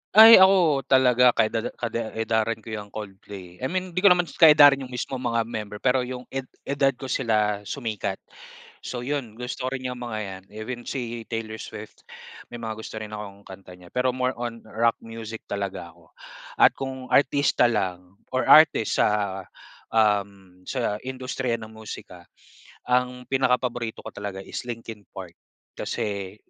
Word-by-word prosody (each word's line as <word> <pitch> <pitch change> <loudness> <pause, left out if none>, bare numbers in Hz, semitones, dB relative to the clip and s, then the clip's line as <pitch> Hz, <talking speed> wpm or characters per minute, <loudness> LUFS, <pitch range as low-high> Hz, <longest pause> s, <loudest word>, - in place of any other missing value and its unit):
Ay, 225 0 +11
ako 175 -8 +4
talaga 125 -2 +5
ka-edad 110 +1 +1
kade 115 -1 -4
edaran 110 0 -1
ko 110 - -9
yang 105 -1 -5
Coldplay. 95 -3 -10
I 130 - -2
mean, 185 +3 -3
hindi 180 - -1
ko 200 - +5
naman 180 -2 +6 0.2
kaedaran 145 -3 +8
'yong 130 -2 -8
mismong 125 +1 -4
mga 120 -2 0
member. 105 -2 -6
Pero 130 0 +3
'yong 125 0 -5
ed 135 -1 -4 0.2
edad 140 -1 +1
ko 130 0 -7
sila 105 -5 +1
sumikat. 110 -7 -3 0.7
So 120 -1 -5
'yon, 130 -5 -3
gusto 125 +1 -5
rin 130 -1 -4
'yong 125 -1 -6
mga 120 -3 -4
'yan, 95 -1 -8
even 110 +3 -6
si 120 -3 -4
Taylor 115 -1 -4
Swift 105 +1 -10 0.4
may - - -7
mga 110 -1 -4
gusto 110 - -8
rin 105 -1 -7
akong 100 -1 -8
kanta 95 -1 -12
niya. 90 -1 -16
Pero 125 0 +1
more 130 0 0
on 120 -1 -5
rock 115 +1 +1
music 115 -1 -8
talaga 95 -4 -4
ako. 85 0 -24 0.5
At - - +7
kung 130 -1 -6
artista 140 -3 +3
lang 90 -5 -3 0.2
or 130 0 0
artist 155 -8 +6
sa, 100 -2 +1 0.5
um, 100 -4 0
sa 120 -5 -1
industriya 130 -1 -3
ng 110 -1 -10
musika 100 -5 -9 0.7
ang 125 0 0
pinakapaborito 125 -3 0
ko 110 - -6
talaga 100 -2 -6
is - - -6
Linkin 115 -3 -7
Park 95 -3 -8 0.5
kasi 100 -2 -4
115 Hz, 160 wpm, -25 LUFS, 105-130 Hz, 0.7 s, Ay